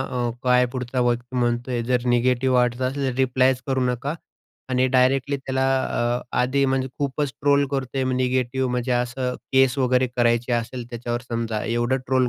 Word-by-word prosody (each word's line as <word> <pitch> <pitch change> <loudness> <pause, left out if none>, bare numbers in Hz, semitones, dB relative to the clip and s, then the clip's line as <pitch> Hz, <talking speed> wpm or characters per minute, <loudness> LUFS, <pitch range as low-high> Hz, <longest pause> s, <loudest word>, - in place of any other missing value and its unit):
अ, 125 -2 -2
काय 125 0 +4
पुढचा 125 0 -2
व्यक्ती 120 +1 -1
म्हणतोय. 120 0 0
जर 125 +1 0
निगेटिव्ह 125 +1 +2
वाटतं 125 +1 +1
असेल 135 +1 -2
तर - - -6
रिप्लायच 130 0 +2
करू 135 -1 0
नका 130 +5 -3 0.5
आणि 130 0 +2
डायरेक्टली 130 +2 +2
त्याला 130 0 -2 0.2
अ, 120 +1 -1 0.2
आधी 135 +3 +2
म्हणजे 130 0 0
खूपच 140 0 -1
ट्रोल 140 0 +3
करतोय, 135 -1 -2
म, 130 - 0
निगेटिव्ह. 130 0 0
म्हणजे 125 +1 -1
असं 125 +1 -1 0.2
केस 135 0 +4
वगैरे 130 0 +2
करायची 120 0 +2
असेल 120 +1 -2
त्याच्यावर 120 0 -3
समजा 115 -2 -2
एवढं 120 +3 0
ट्रोल 130 -1 +2
125 Hz, 165 wpm, -23 LUFS, 120-130 Hz, 0.5 s, काय